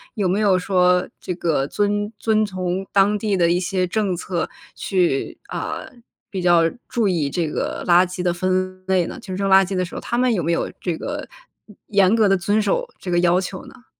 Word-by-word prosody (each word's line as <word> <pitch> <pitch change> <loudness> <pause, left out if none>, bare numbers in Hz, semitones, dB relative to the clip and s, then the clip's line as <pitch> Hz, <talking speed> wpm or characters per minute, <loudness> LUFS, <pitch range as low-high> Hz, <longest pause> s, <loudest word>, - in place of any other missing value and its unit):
有 205 -4 0
没 190 +3 +1
有 200 -3 +3
说， 180 -1 +2
这 180 - -4
个 160 -6 0
遵 205 +3 -1
遵 215 0 +2
从 185 -1 -3
当 200 +1 +4
地 205 -2 0
的 170 -1 +3
一 175 - +2
些 185 0 0
政 195 0 -1
策 175 -1 -3 0.3
去， 180 -8 0
啊， - - -4 0.5
比 190 -4 -4
较 175 -1 +4 0.3
注 230 -4 +1
意 165 -7 0
这 165 +3 -1
个 150 - -3
垃 175 +1 +6
圾 180 0 -6
的 180 -1 +1
分 185 +1 -1
类 185 -2 +2
呢？ - - -7
就 190 -4 -7
扔 195 +1 -1
垃 190 0 +6
圾 190 - -5
的 185 0 0
时 175 - -10
候， - - -5
他 240 - -2
们 250 -1 +3
有 180 -6 -1
没 165 - 0
有 170 - 0
这 175 -3 -2
个， 290 +1 -5 0.6
严 200 -1 +4
格 220 -2 +4
地 195 - +4
遵 205 +4 +1
守 485 - 0
这 185 - -7
个 175 0 +2
要 175 +1 +3
求 190 0 -6
呢？ 245 - -16
185 Hz, 230 characters per minute, -21 LUFS, 175-205 Hz, 0.6 s, 垃